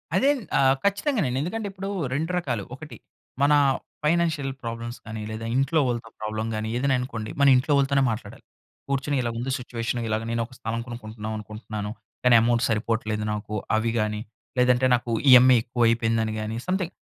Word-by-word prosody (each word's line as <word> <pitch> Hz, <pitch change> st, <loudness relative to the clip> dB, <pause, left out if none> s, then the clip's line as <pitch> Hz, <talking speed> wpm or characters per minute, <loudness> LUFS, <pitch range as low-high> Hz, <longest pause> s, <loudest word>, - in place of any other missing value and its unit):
అదేన్ 280 Hz, -1 st, +3 dB, 0.2 s
ఆహ్, 135 Hz, 0 st, +5 dB
ఖచ్చితంగానండి. 200 Hz, -, +1 dB
ఎందుకంటే, 205 Hz, +7 st, -3 dB
ఇప్పుడూ 195 Hz, +1 st, -6 dB, 0.2 s
2 160 Hz, +5 st, -1 dB
రకాలు. 120 Hz, -, -2 dB
ఒకటి 150 Hz, +2 st, -10 dB, 0.4 s
మనా 145 Hz, +1 st, +5 dB, 0.5 s
ఫైనాన్షియల్ 160 Hz, -4 st, +1 dB
ప్రాబ్లమ్స్ 115 Hz, +1 st, -5 dB
కానీ, 110 Hz, -1 st, -6 dB
లేదా 110 Hz, +1 st, -5 dB
ఇంట్లో 135 Hz, +4 st, +2 dB
ఓళ్ళతో 120 Hz, -2 st, -3 dB
ప్రాబ్లమ్ 110 Hz, +1 st, -3 dB
గానీ, 110 Hz, 0 st, -3 dB
ఏదైనా 135 Hz, +1 st, +2 dB
అనుకోండి. 115 Hz, -4 st, -5 dB
మన 140 Hz, -, +5 dB
ఇంట్లో 130 Hz, +4 st, +1 dB
వాళ్ళుతోనే 140 Hz, 0 st, +3 dB
మాట్లాడాలి. 110 Hz, -2 st, -7 dB, 0.5 s
కూర్చొని 140 Hz, +1 st, 0 dB
ఇలా 120 Hz, -, -1 dB
ఉంది 125 Hz, +3 st, -2 dB
సిచ్యువేషను. 120 Hz, -1 st, -3 dB
ఇలాగ 110 Hz, +1 st, -1 dB
నేనొక 115 Hz, +2 st, -2 dB
స్థలం 115 Hz, -2 st, -3 dB
కొనుక్కుంటన్నావనుకుంటున్నాను, 110 Hz, -2 st, -6 dB, 0.3 s
కానీ 125 Hz, -1 st, +6 dB
ఎమౌంట్ 120 Hz, +1 st, +2 dB
సరిపోవట్లేదు 110 Hz, -1 st, -1 dB
నాకు. 105 Hz, 0 st, -5 dB, 0.2 s
అవి 115 Hz, +1 st, 0 dB
గానీ, 105 Hz, 0 st, -1 dB, 0.4 s
లేదంటే 125 Hz, 0 st, +4 dB
నాకు 120 Hz, -1 st, -4 dB, 0.2 s
ఈఎంఐ 125 Hz, 0 st, +9 dB
ఎక్కువయిపోయిందని 115 Hz, -2 st, +1 dB
గానీ, 110 Hz, +1 st, -4 dB
సంథింగ్ 185 Hz, -1 st, -1 dB
120 Hz, 150 wpm, -25 LUFS, 110-140 Hz, 0.5 s, ఈఎంఐ